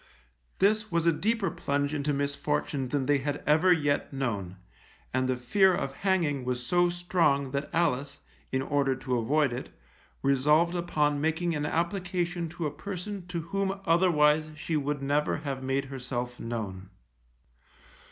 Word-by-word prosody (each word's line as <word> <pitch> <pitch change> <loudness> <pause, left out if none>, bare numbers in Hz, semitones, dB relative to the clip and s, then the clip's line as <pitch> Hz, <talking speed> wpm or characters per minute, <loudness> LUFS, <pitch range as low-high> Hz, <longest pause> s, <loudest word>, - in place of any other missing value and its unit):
This 210 +2 +2
was 170 -1 +1
a 170 - +5
deeper 220 +4 0
plunge 145 +1 -1
into 150 0 0
misfortune 140 -1 -1
than 135 +1 -1
they 145 0 +3
had 145 +1 -3
ever 155 +5 +4
yet 145 -4 +1
known, 105 -9 -3 0.6
and 130 0 +1
the 130 - +1
fear 185 +10 +3
of 135 -5 -3
hanging 170 -9 +1
was 125 0 -2
so 175 +4 +3
strong 170 -6 +1
that 140 +1 -2
Alice, 145 -5 0 0.3
in 130 0 0
order 140 -1 +1
to 130 -1 -2
avoid 140 +3 +2
it, 125 - -5 0.5
resolved 150 +5 +3
upon 150 -4 0
making 160 +2 0
an 150 -1 -1
application 175 0 -1
to 170 0 -5
a 150 - -1
person 195 0 -6
to 175 -2 -3
whom 195 +3 -2
otherwise 155 -3 +4
she 155 +1 -3
would 145 -1 -1
never 145 +2 +1
have 140 -3 -4
made 135 +1 -1
herself 125 -2 -5
known. 100 -5 -5
150 Hz, 150 wpm, -28 LUFS, 135-175 Hz, 0.6 s, a